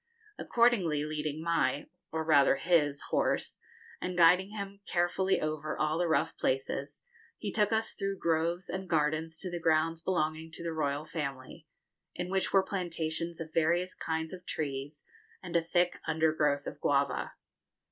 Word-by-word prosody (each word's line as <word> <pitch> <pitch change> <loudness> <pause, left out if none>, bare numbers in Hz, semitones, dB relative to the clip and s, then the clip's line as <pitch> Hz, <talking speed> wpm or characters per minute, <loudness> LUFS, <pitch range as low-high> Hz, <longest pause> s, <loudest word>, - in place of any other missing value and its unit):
Accordingly, 190 -12 +2
leading 155 0 -3
my 165 -3 +1 0.3
or 160 0 -1
rather 145 -4 +5
his 145 -2 +2
horse, - - 0 0.4
and 180 -1 -3
guiding 180 +3 +6
him 200 -1 -7
carefully 180 +2 +1
over 155 0 -3
all 155 +2 0
the 175 - +2
rough 160 - +1
places, 135 +1 -2 0.3
he - - -4
took 210 -1 +2
us 220 0 +1
through 195 -1 -3
groves 170 +1 0
and 190 -1 -5
gardens 160 0 0
to 180 +2 -4
the 175 - -3
grounds 165 0 +2
belonging 160 -3 -1
to 170 - -6
the 165 -1 -2
royal 145 -1 -1
family, 150 0 -6 0.5
in 180 +1 -4
which 190 -1 +1
were 195 -1 +5
plantations 170 -3 -3
of 160 -1 -7
various 170 +3 +2
kinds 160 +1 -3
of 180 -1 -8
trees, 145 0 -4 0.4
and 175 - -6
a 170 - +5
thick 175 +2 +1
undergrowth 155 -3 +2
of 150 - -7
guava. 140 -1 +1
160 Hz, 155 wpm, -31 LUFS, 155-180 Hz, 0.5 s, guiding